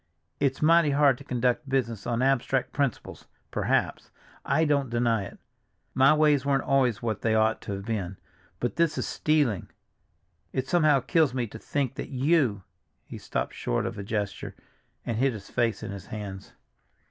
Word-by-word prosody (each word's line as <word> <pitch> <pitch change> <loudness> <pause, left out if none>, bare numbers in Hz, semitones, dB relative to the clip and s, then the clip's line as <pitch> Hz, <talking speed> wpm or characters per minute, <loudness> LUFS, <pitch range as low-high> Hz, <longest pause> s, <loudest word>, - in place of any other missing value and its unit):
"It's 135 +1 0
mighty 165 0 +5
hard 140 -2 +3
to - - -10
conduct 125 +3 -1
business 115 -6 -1
on 120 0 0
abstract 135 -1 +1
principles—perhaps—I 145 +3 -2
don't 140 -3 +1
deny 115 -3 +1
it! - - -11 0.6
My 135 +3 +5
ways 150 -3 +3
weren't 140 -1 +1
always 130 -5 +1
what 110 -2 -2
they 110 -1 +1
ought 110 0 +2
to 100 - -5
have 100 0 -6
been. 100 -5 -3 0.4
But 120 - -2
this 165 -2 +2
is - - -1
stealing. 145 - 0 0.8
It 130 0 -2
somehow 155 -4 +4
kills 145 0 +2
me 125 -2 0
to 110 0 -10
think 140 +1 -2
that - - -5
you—" 130 - +1 0.4
he - - -9
stopped - - -3
short - - -2
with - - -4
a - - -4
gesture, 100 -1 -4 0.5
and 115 - -2
hid 135 +1 +2
his 100 -3 -10
face 120 -3 0
in - - -5
his 100 -2 -8
hands. 100 -2 -7
125 Hz, 165 wpm, -27 LUFS, 110-140 Hz, 0.8 s, mighty